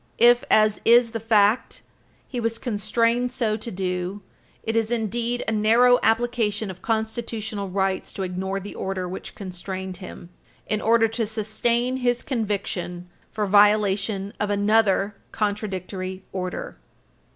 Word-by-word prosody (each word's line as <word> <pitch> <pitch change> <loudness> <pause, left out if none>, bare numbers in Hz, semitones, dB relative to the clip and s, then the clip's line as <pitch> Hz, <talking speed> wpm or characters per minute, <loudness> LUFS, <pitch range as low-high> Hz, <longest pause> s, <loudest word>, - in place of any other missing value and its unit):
If, 240 +1 +6
as 215 -1 +4
is 235 0 +5
the 225 - -3
fact, 215 0 +2 0.4
he 250 - -4
was 230 -1 -1
constrained 235 +2 0
so 230 -4 0
to 220 +2 -6
do, 185 0 -3 0.4
it 225 - -2
is 225 -1 +1
indeed 235 +1 -1
a - - +1
narrow 230 +4 +5
application 225 -3 +1
of 185 0 -13
constitutional 220 -2 -3
rights 190 0 -1
to 195 - -4
ignore 190 +1 -3
the 200 +1 -8
order 190 -1 -3
which 185 +2 -7
constrained 185 -1 -6
him 180 -2 -10 0.4
in 215 0 -1
order 225 0 +4
to 225 0 -2
sustain 235 +3 0
his 245 -1 0
conviction 195 -7 -3 0.2
for 210 -1 -1
violation 205 0 +3
of 210 - -1
another 205 -1 +2
contradictory 190 -3 -3
order. 185 -1 -4
210 Hz, 135 wpm, -24 LUFS, 195-230 Hz, 0.4 s, If